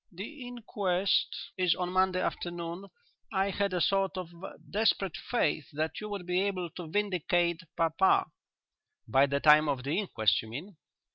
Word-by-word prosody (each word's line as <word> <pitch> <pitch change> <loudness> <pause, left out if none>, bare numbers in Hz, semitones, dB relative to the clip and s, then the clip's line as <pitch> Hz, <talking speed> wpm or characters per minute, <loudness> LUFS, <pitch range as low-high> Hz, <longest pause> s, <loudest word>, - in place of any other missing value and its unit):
"The 245 - -8
inquest 200 -6 -1
is 180 -2 +3
on 180 -1 -2
Monday 185 0 +2
afternoon.... 175 +1 -4 0.5
I 195 -1 +1
had 200 +1 0
a 180 - 0
sort 195 +2 +1
of 175 -2 -6 0.3
desperate 200 -4 +1
faith 155 - -1
that 155 +4 -2
you 210 - -5
would 200 -3 -5
be 180 +1 +1
able 185 -4 -2
to 175 -1 -8
vindicate 175 -2 0 0.2
papa." 165 +3 +3 0.8
"By 135 +5 +4
the 140 +1 0
time 150 0 +6
of 135 -3 -1
the 145 +8 0
inquest, 110 - +2
you 110 - -11
mean?" 155 - -8
180 Hz, 155 wpm, -30 LUFS, 160-195 Hz, 0.8 s, time